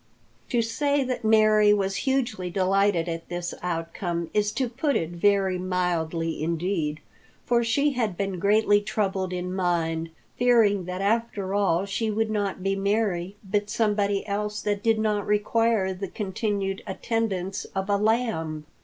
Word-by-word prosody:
To 240 -2 +2
say 285 +5 +1
that 255 -2 -3
Mary 215 -1 +5
was 195 -1 -1
hugely 240 -9 0
delighted 190 -1 +2
at 165 -1 -5
this 175 0 -4
outcome 170 0 -3
is 210 0 +2
to 260 - 0
put 270 +5 -1
it 165 0 -1
very 190 +1 +2
mildly 170 -3 -1
indeed. 165 -2 -1 0.4
For 240 -1 +2
she 280 +6 +2
had 225 -9 -1
been 195 -2 -2
greatly 205 +1 +4
troubled 195 -3 -1
in 180 0 -3
mind, 165 -3 0 0.3
fearing 225 -6 +4
that 180 +1 -4
after 205 -2 0
all 195 -3 +2
she 220 +3 -2
would 215 +1 0
not 200 -3 -2
be 195 0 +1
Mary 200 -2 0
but 205 +1 -1
somebody 205 -2 +1
else 210 +1 -2
that 205 -1 -1
did 225 0 +2
not 210 -2 0
require 210 -1 +2
the 195 +1 -5
continued 195 0 -2
attendance 195 -2 -2
of 190 0 -1
a 205 - +2
lamb. 205 -9 0
200 Hz, 150 wpm, -25 LUFS, 180-215 Hz, 0.4 s, Mary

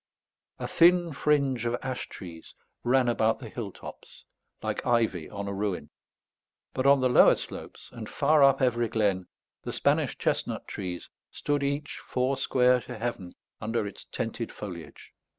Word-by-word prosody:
A - - -4
thin 175 -1 +4
fringe 140 -5 +1
of 120 +1 0
ash 130 -1 -4
trees 85 -4 -10 0.3
ran 125 +1 +3
about 110 -1 +2
the 120 -5 -9
hill 105 -3 -5
tops, - - -12 0.4
like - - -2
ivy 115 -9 +1
on 100 -1 -5
a 100 - -3
ruin; 95 -7 -3 0.8
but, 130 +1 +1
on 140 -1 +6
the 130 - +4
lower 125 - +7
slopes, - - -9
and 115 -3 -8
far 150 +1 +3
up 135 -1 +5
every 120 -2 +2
glen, 100 -5 0 0.3
the - - -5
Spanish - - +1
chestnut - - -1
trees 90 -4 -6 0.2
stood 145 -1 -1
each 140 +1 -2
four 130 +2 0
square 125 -1 +3
to 125 -1 -8
heaven 110 -6 -4 0.3
under 110 0 -1
its 100 - -8
tented 115 0 -4
foliage. 85 -7 -9
120 Hz, 155 wpm, -28 LUFS, 105-135 Hz, 0.8 s, lower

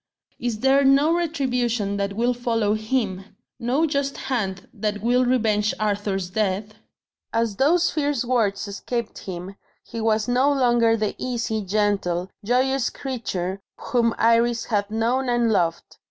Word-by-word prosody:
is 230 -3 -3
there 270 +1 +4
no 275 +4 +4
retribution 250 -11 0
that 200 0 -2
will 240 +4 +1
follow 230 -3 0
him? 215 -3 -1 0.4
no 260 +7 +1
just 280 -2 -1
hand 195 -8 -3
that 210 -1 -3
will 245 +2 +3
revenge 220 -4 +1
Arthur's 200 -3 -1
death?" 210 +1 -1 0.6
As 230 -3 0
those 330 +6 +3
fierce 285 -5 0
words 215 -5 0
escaped 230 +3 -4
him, 185 +1 -7 0.3
he 230 - -6
was 220 -1 +1
no 255 +4 +3
longer 240 -4 +3
the 215 -1 -1
easy, 230 -3 -2
gentle, 195 -3 0
joyous 255 +3 +1
creature 195 -8 -4 0.2
whom 235 -2 0
Iris 230 +1 +3
had 205 -2 -1
known 240 +4 0
and 240 -1 +2
loved. 170 -5 -1
230 Hz, 140 wpm, -23 LUFS, 205-250 Hz, 0.6 s, there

